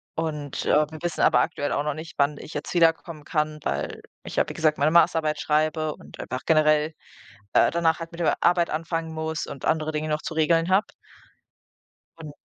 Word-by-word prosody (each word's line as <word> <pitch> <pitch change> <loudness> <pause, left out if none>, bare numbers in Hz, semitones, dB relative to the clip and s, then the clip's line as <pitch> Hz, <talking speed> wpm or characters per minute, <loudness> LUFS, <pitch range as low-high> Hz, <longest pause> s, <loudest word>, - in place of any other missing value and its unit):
Und, 150 -3 -3
äh, - - -1 0.2
wir 155 - -8
wissen 175 -1 -2
aber 125 - +5
aktuell 145 +3 -1
auch 145 - 0
noch 150 -1 -1
nicht, 165 +1 -8
wann 145 0 +2
ich - - -10
jetzt - - -5
wiederkommen 165 -2 +2
kann, 150 -1 -1
weil 70 +1 -3 0.2
ich, - - -8
ja, - - +2
wie - - -6
gesagt, 155 -2 +1
meine 150 +2 +2
Masterarbeit 160 -3 +3
schreibe 155 0 0
und - - -15
einfach 130 +1 -4
generell, 155 -1 +3 0.6
äh, - - +5
danach 165 -1 +1
halt 165 0 -7
mit 170 - -9
der - - +2
Arbeit 175 -1 +3
anfangen 165 +1 -3
muss 160 -1 -3
und 135 - -7
andere 155 0 +1
Dinge 155 0 -3
noch 150 0 -1
zu - - -5
regeln 165 +2 +2
habe. 190 +3 +3 1.3
Un 155 -3 -9
155 Hz, 195 wpm, -25 LUFS, 150-165 Hz, 1.3 s, aber